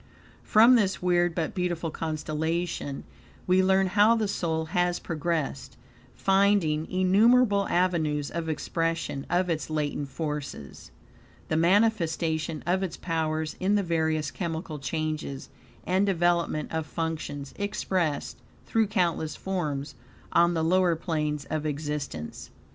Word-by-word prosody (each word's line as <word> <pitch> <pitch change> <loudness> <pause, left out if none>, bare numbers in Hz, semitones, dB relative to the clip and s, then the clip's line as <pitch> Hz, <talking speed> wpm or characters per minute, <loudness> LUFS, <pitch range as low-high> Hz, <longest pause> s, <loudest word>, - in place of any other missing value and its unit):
From 230 +4 +6
this 195 -4 +1
weird, 175 -1 +2
but 165 -3 -2
beautiful 175 -3 -2
constellation, 160 -1 -3 0.4
we 185 +1 +4
learn 190 0 +4
how 205 +4 +4
the 220 -2 0
soul 160 -4 -1
has 175 -1 +2
progressed, 160 -4 -3 0.4
finding 195 -6 +2
innumerable 200 +3 +4
avenues 160 -5 +1
of 165 -1 -3
expression 165 -3 -2
of 180 +1 +2
its 160 -3 -2
latent 145 -2 -2
forces; 145 - -6 0.6
the - - +1
manifestation 165 -4 +1
of 180 +3 +1
its 185 -4 -3
powers 160 -2 -2
in 195 +3 +2
the 205 - +2
various 160 -3 0
chemical 165 -3 -4
changes, 155 -1 -3 0.4
and 190 +2 +2
development 170 -4 +1
of 160 -1 -2
functions 155 -4 -4
expressed 185 -6 -1 0.3
through 225 -1 +1
countless 175 -6 0
forms, 150 -7 -3 0.4
on 170 0 +4
the 160 - 0
lower 175 0 +3
planes 150 -3 -2
of 155 -1 -1
existence. 145 - -4
165 Hz, 120 wpm, -27 LUFS, 155-185 Hz, 0.6 s, From